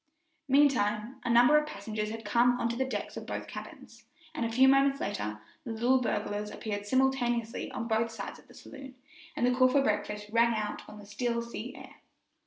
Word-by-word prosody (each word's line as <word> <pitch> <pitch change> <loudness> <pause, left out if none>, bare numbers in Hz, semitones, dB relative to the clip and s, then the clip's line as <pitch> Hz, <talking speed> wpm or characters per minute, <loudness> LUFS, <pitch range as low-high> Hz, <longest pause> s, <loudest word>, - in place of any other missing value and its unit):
Meantime, 255 -4 +2
a 245 - -2
number 245 +5 +6
of 300 - -5
passengers 210 -3 -4
had 225 0 -7
come 245 +3 +3
on 235 - +1
to 235 - -2
the 265 +2 0
decks - - -4
of - - -7
both - - -4
cabins, - - -10 0.3
and 280 - -3
a 230 - -1
few 260 +3 +5
moments 275 +1 +4
later 105 +1 -3 0.2
the 235 -5 -5
little 250 +3 +2
buglers 210 -2 -2
appeared 205 -2 -5
simultaneously 240 -2 0
on 230 - -5
both 225 0 +1
sides 225 -3 -7
of - - -21
the - - -17
saloon, 270 -2 -11 0.4
and 245 - +1
the 250 - +3
call 255 0 +5
for 275 +2 +3
breakfast 210 -2 -1
rang 235 0 +3
out 210 -1 -3
on 210 - -11
the 205 - -12
still 235 +3 -2
sea 235 +1 -7
air. - - -12
235 Hz, 200 wpm, -30 LUFS, 210-255 Hz, 0.4 s, number